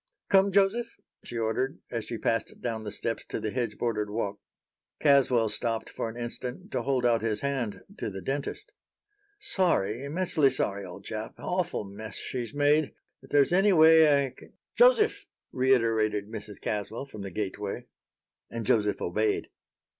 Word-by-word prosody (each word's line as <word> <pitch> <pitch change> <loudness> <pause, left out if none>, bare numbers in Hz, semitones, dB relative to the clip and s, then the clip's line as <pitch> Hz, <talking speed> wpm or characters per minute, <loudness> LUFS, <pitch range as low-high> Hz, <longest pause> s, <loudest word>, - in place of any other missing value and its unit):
"Come, 195 0 +5
Joseph," 200 +5 +2 0.3
she 120 - -6
ordered, 115 +4 -1
as 115 -3 -3
she 115 - -4
passed 115 0 -1
down 115 -2 -3
the 105 - -5
steps 115 +2 -3
to - - -4
the 110 - -3
hedge 120 -4 -2
bordered 105 -3 -1
walk. 105 -1 -3 0.6
Caswell 135 -6 +4
stopped 115 +1 -2
for 115 - -3
an 115 - -9
instant 120 +1 -5
to 130 - -1
hold 130 0 0
out 115 -1 +3
his 110 -2 -1
hand 135 -6 -2 0.2
to - - -2
the 95 -1 -6
dentist. 140 - -4 0.7
"Sorry, 135 - 0
immensely 155 -1 +2
sorry, 100 -6 -1
old 95 +1 -10
chap. 110 0 -5
Awful 180 -8 -2
mess 105 +2 -8
she's 120 -3 -4
made. 145 +1 +2 0.3
If - - -16
there's 145 +3 +4
any 195 +2 +5
way 160 -3 +7
I 130 - -6
can" - - -17 0.2
"Joseph!" 485 -3 +4 0.2
reiterated 115 -5 +2
Mrs. 105 -2 -8
Caswell 105 +5 -3
from 110 -7 -10
the 100 - -5
gateway. 100 +1 -4 0.6
And 115 -1 -5
Joseph 105 -1 +2
obeyed. 105 +4 0
120 Hz, 160 wpm, -28 LUFS, 110-145 Hz, 0.7 s, way